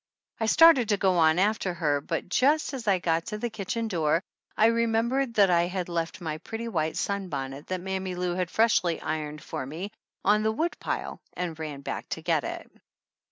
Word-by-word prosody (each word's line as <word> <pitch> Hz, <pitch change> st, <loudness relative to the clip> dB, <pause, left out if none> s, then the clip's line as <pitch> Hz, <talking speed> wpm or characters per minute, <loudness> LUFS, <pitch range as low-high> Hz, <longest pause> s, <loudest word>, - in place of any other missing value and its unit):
I 225 Hz, -, 0 dB
started 295 Hz, -4 st, +6 dB
to 205 Hz, -, +3 dB
go 185 Hz, -3 st, +2 dB
on 160 Hz, 0 st, +5 dB
after 195 Hz, -2 st, +1 dB
her, 145 Hz, -3 st, +1 dB
but -, -, -3 dB
just 285 Hz, -, +2 dB
as 245 Hz, -4 st, -6 dB
I 195 Hz, -2 st, +4 dB
got 165 Hz, -1 st, 0 dB
to 210 Hz, -, -3 dB
the 235 Hz, +2 st, -3 dB
kitchen 220 Hz, +2 st, -3 dB
door 165 Hz, -3 st, +1 dB, 0.3 s
I 215 Hz, -, +5 dB
remembered 230 Hz, +2 st, +1 dB
that 200 Hz, -3 st, +5 dB
I 170 Hz, 0 st, +3 dB
had 180 Hz, -1 st, -3 dB
left 170 Hz, +1 st, -3 dB
my 155 Hz, -2 st, -4 dB
pretty 225 Hz, +6 st, -6 dB
white 160 Hz, -7 st, -1 dB
sunbonnet 145 Hz, -9 st, -3 dB
that 185 Hz, -1 st, -3 dB
Mammy 190 Hz, 0 st, -3 dB
Lou 180 Hz, 0 st, -1 dB
had 180 Hz, -1 st, -1 dB
freshly 200 Hz, -7 st, +2 dB
ironed 155 Hz, -1 st, -4 dB
for -, -, -4 dB
me 165 Hz, +10 st, -6 dB, 0.3 s
on 210 Hz, +2 st, +4 dB
the 220 Hz, 0 st, +2 dB
woodpile 325 Hz, +10 st, -3 dB
and 170 Hz, -3 st, -4 dB
ran 150 Hz, -3 st, -5 dB
back -, -, -5 dB
to -, -, -10 dB
get -, -, +1 dB
it. -, -, -6 dB
185 Hz, 195 wpm, -27 LUFS, 165-220 Hz, 0.3 s, started